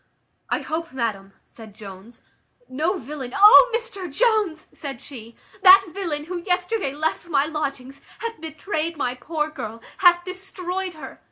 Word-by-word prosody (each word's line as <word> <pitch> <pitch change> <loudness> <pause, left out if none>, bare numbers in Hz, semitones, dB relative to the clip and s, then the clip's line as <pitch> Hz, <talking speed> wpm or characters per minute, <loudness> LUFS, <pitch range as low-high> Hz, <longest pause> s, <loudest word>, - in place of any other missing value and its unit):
"I - - 0
hope, 320 -2 -4
madam," 205 -6 -3
said 220 -3 -14
Jones, 205 +2 -12 0.4
"no 320 +9 -1
villain" 265 -3 -7
"O 425 +5 +9
Mr 400 -8 -7
Jones!" 420 - +1
said 275 -4 -7
she, 235 -5 -10 0.3
"that 385 +1 +9
villain 335 -7 -3
who 360 +2 -5
yesterday 360 -1 -1
left 315 +3 -2
my 285 -4 +2
lodgings, 280 -4 -5 0.2
hath 460 -5 -6
betrayed 320 +1 -3
my 250 -4 -1
poor 300 +4 -3
girl; 230 -6 -7 0.2
hath 350 -2 +5
destroyed 370 -1 -5
her. 275 -4 -10
315 Hz, 145 wpm, -23 LUFS, 265-370 Hz, 0.4 s, O